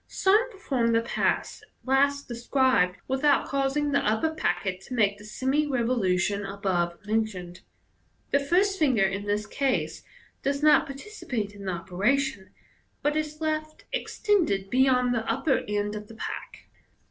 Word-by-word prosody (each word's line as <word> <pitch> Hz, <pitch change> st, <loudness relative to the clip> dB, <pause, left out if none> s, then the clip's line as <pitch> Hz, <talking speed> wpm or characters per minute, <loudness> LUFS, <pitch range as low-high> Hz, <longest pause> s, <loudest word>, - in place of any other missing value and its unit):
Some 425 Hz, +6 st, +3 dB
perform 265 Hz, -, -1 dB
the 230 Hz, -, +4 dB
pass 230 Hz, -, -1 dB, 0.2 s
last 280 Hz, +2 st, +2 dB
described 240 Hz, -6 st, +2 dB
without 270 Hz, +2 st, +2 dB
causing 275 Hz, +1 st, 0 dB
the 280 Hz, -, +3 dB
upper 220 Hz, +9 st, +1 dB
packet 190 Hz, -11 st, -1 dB
to 255 Hz, -, -5 dB
make 205 Hz, -3 st, +2 dB
the -, -, -12 dB
semi 265 Hz, +7 st, 0 dB
revolution 205 Hz, -7 st, +1 dB
above 190 Hz, -3 st, -1 dB
mentioned. 205 Hz, -5 st, -2 dB, 0.7 s
The 280 Hz, -, +4 dB
first 375 Hz, +7 st, +2 dB
finger 260 Hz, -10 st, +3 dB
in 195 Hz, +1 st, -1 dB
this 205 Hz, +1 st, -1 dB
case 270 Hz, +2 st, -1 dB, 0.4 s
does 280 Hz, +1 st, -1 dB
not 305 Hz, -, +5 dB
participate 275 Hz, -, -5 dB
in 200 Hz, -1 st, -10 dB
the 185 Hz, -, -1 dB
operation, 200 Hz, +6 st, -1 dB, 0.5 s
but 295 Hz, +1 st, +1 dB
is 305 Hz, 0 st, -3 dB
left 310 Hz, 0 st, -3 dB
extended 345 Hz, -, 0 dB
beyond 255 Hz, -1 st, +3 dB
the 225 Hz, -1 st, -1 dB
upper 270 Hz, +4 st, +1 dB
end 205 Hz, 0 st, -1 dB
of 210 Hz, 0 st, -7 dB
th«* 225 Hz, -, -13 dB
pack. -, -, -6 dB
250 Hz, 145 wpm, -27 LUFS, 205-285 Hz, 0.7 s, not